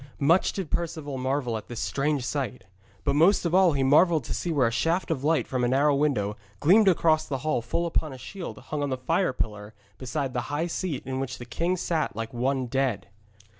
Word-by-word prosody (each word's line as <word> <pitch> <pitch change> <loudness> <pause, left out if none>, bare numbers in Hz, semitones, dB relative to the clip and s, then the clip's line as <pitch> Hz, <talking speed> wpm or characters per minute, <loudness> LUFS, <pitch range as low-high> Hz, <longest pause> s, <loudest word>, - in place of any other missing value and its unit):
Much 165 +6 +3
did 190 -6 -5
Perceval 155 -5 -3
marvel 130 -3 -1
at 110 - -9
this 120 -2 -6
strange 140 -2 -1
sight, 125 -5 -3 0.4
but - - +1
most 175 +6 +4
of 170 - 0
all 185 -3 +5
he 135 -1 +1
marvelled 155 +3 +4
to - - -4
see 175 - -2
where 140 -6 +3
a 115 - +1
shaft 165 +11 0
of 140 -4 -2
light 160 +2 +2
from 130 -2 -2
a - - +3
narrow 140 +4 +3
window 135 -8 0 0.2
gleamed 200 +7 +5
across 160 -3 +3
the 135 - -2
hall 155 -6 +1
full 145 +9 -2
upon 160 -2 -1
a 130 - -8
shield 175 +8 -7
hung 150 -1 -5
on 145 - -1
the 130 - -1
fire 165 +7 +1
pillar 105 -3 -5 0.2
beside 135 +1 -3
the 125 - -1
high 150 +3 -1
seat 170 -4 -3
in 130 0 -3
which 130 -1 -4
the 120 - -8
king 170 +10 -1
sat 165 -7 -1
like 115 +1 -5
one 130 +2 0
dead. 125 -6 -1
140 Hz, 220 wpm, -26 LUFS, 125-165 Hz, 0.4 s, all